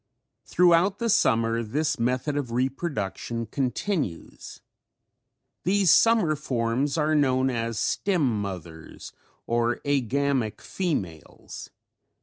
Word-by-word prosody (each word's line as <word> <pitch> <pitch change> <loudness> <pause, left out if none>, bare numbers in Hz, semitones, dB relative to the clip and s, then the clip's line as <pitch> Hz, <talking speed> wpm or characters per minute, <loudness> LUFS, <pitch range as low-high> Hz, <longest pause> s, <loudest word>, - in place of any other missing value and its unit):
Throughout 180 +2 +3
the 230 -1 0
summer 115 - +2
this 145 +8 -2
method 125 +5 -1
of 140 -5 -3
reproduction 120 - -3
continues. 130 - -4 1.0
These 190 -2 +3
summer 220 -7 +4
forms 130 +1 -1
are 155 0 +1
known 130 -3 +2
as 115 -2 -3
the - - 0
stem 145 - 0
mothers 85 -5 -8 0.3
or 120 +1 +1
agamic 140 -3 0
females. 95 - -5
130 Hz, 100 wpm, -25 LUFS, 115-155 Hz, 1.0 s, summer